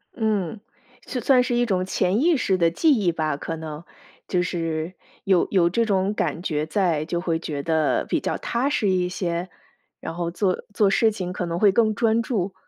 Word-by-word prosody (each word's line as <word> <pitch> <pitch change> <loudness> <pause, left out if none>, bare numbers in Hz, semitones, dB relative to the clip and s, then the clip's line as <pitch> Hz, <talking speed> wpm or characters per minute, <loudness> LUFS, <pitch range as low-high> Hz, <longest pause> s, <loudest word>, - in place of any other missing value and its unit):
嗯， 215 -3 -1 0.5
就 250 - -3
算 250 +1 +4
是 245 -1 -1
一 245 - +2
种 185 -4 0
潜 190 +4 +1
意 335 -2 +4
识 190 -6 +1
的 165 -1 +3
记 310 - +3
忆 190 -6 +1
吧， 155 -3 -2
可 165 +2 -4
能， 155 0 -7 0.4
就 180 - +1
是 165 -1 -2 0.3
有 190 -3 +3
有 175 -3 +4
这 230 +5 +1
种 195 -1 +1
感 170 - -2
觉 155 -4 -1
在， 165 -2 0
就 170 +1 -2
会 165 -3 0
觉 145 -3 -4
得 160 0 +1
比 - - 0
较 - - -2
踏 250 +4 -1
实 210 -7 +1
一 180 -1 +1
些？ 180 -1 -3 0.5
然 - - -6
后 170 -1 -2
做 185 +1 -1
做 205 -2 +4
事 220 +2 +3
情 185 -3 -5
可 180 - -3
能 170 +1 -2
会 205 -2 +5
更 220 0 +3
专 225 +1 +2
注。 200 -5 -2
185 Hz, 220 characters per minute, -23 LUFS, 170-215 Hz, 0.5 s, 会